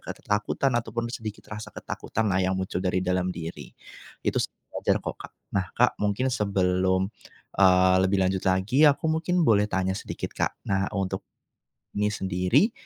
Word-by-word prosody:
ketakutan 105 Hz, +6 st, -1 dB
ataupun 115 Hz, 0 st, -2 dB
sedikit 110 Hz, -3 st, -7 dB
rasa 110 Hz, 0 st, -7 dB
ketakutanlah 100 Hz, -4 st, -2 dB
yang 95 Hz, -, +1 dB
muncul 95 Hz, -1 st, -2 dB
dari 90 Hz, 0 st, +1 dB
dalam 90 Hz, 0 st, 0 dB
diri. 80 Hz, -5 st, -7 dB, 0.5 s
Itu -, -, 0 dB
sih -, -, -1 dB, 0.3 s
wajar -, -, +1 dB
kok, -, -, -5 dB
Kak. -, -, -9 dB, 0.2 s
Nah 95 Hz, -1 st, 0 dB
Kak 125 Hz, +1 st, +3 dB
mungkin 105 Hz, +6 st, 0 dB
sebelum, 95 Hz, -3 st, +1 dB, 0.5 s
eee, 95 Hz, -1 st, +5 dB
lebih 95 Hz, +1 st, +2 dB
lanjut 95 Hz, 0 st, 0 dB
lagi, 95 Hz, +10 st, +3 dB
aku 145 Hz, +1 st, +4 dB
mungkin 165 Hz, +2 st, +1 dB
boleh 105 Hz, -2 st, +5 dB
tanya 95 Hz, -1 st, 0 dB
sedikit, -, -, -5 dB
Kak. -, -, -1 dB
Nah 95 Hz, -1 st, +1 dB
untuk, 95 Hz, -2 st, -2 dB, 0.7 s
ini 105 Hz, 0 st, 0 dB
sendiri 95 Hz, -, +2 dB
95 Hz, 155 wpm, -26 LUFS, 95-110 Hz, 0.7 s, eee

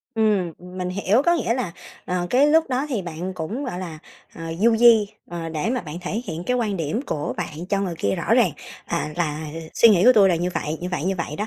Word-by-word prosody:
Ừm, 210 Hz, -6 st, +2 dB
mình 180 Hz, 0 st, -6 dB
hiểu, 200 Hz, +6 st, +2 dB
có 345 Hz, +3 st, +3 dB
nghĩa 235 Hz, -9 st, 0 dB
là, 240 Hz, -9 st, -3 dB, 0.3 s
ờ, 180 Hz, -1 st, -1 dB
cái 265 Hz, +4 st, +5 dB
lúc 320 Hz, +2 st, +4 dB
đó 260 Hz, +3 st, -1 dB
thì 235 Hz, -9 st, -2 dB
bạn 175 Hz, +2 st, -5 dB
cũng, 205 Hz, -, -4 dB
gọi 240 Hz, -9 st, -4 dB
là, 170 Hz, -4 st, -6 dB, 0.4 s
ờ, 165 Hz, -, -8 dB, 0.2 s
du 230 Hz, +1 st, +4 dB
di, 225 Hz, -3 st, +6 dB, 0.2 s
ờ, 170 Hz, -1 st, -4 dB
để 160 Hz, +7 st, -2 dB
mà 250 Hz, -1 st, 0 dB
bạn 155 Hz, -1 st, -8 dB
thể 210 Hz, +6 st, -3 dB
hiện 165 Hz, -2 st, -5 dB
cái 250 Hz, +4 st, +1 dB
quan 215 Hz, -5 st, -1 dB
điểm 165 Hz, +7 st, -2 dB
của 150 Hz, -, -3 dB
bạn 160 Hz, +3 st, -5 dB
cho 200 Hz, -1 st, +1 dB
người 185 Hz, -3 st, -2 dB
kia 100 Hz, -, 0 dB
rõ -, -, +1 dB
ràng, -, -, +4 dB, 0.4 s
à, 150 Hz, -, -2 dB
là 155 Hz, -2 st, -2 dB, 0.3 s
suy 230 Hz, -, +7 dB
nghĩ 195 Hz, -4 st, +5 dB
của 255 Hz, -, +8 dB
tui 205 Hz, -4 st, +6 dB
là 175 Hz, -, +2 dB
như 175 Hz, +2 st, -1 dB
vậy, 155 Hz, +1 st, -2 dB
như 180 Hz, -, -3 dB
vậy, 160 Hz, -, -2 dB
như 190 Hz, +1 st, +1 dB
vậy 160 Hz, -3 st, -4 dB
đó. 210 Hz, -, -2 dB
185 Hz, 250 wpm, -23 LUFS, 170-230 Hz, 0.4 s, của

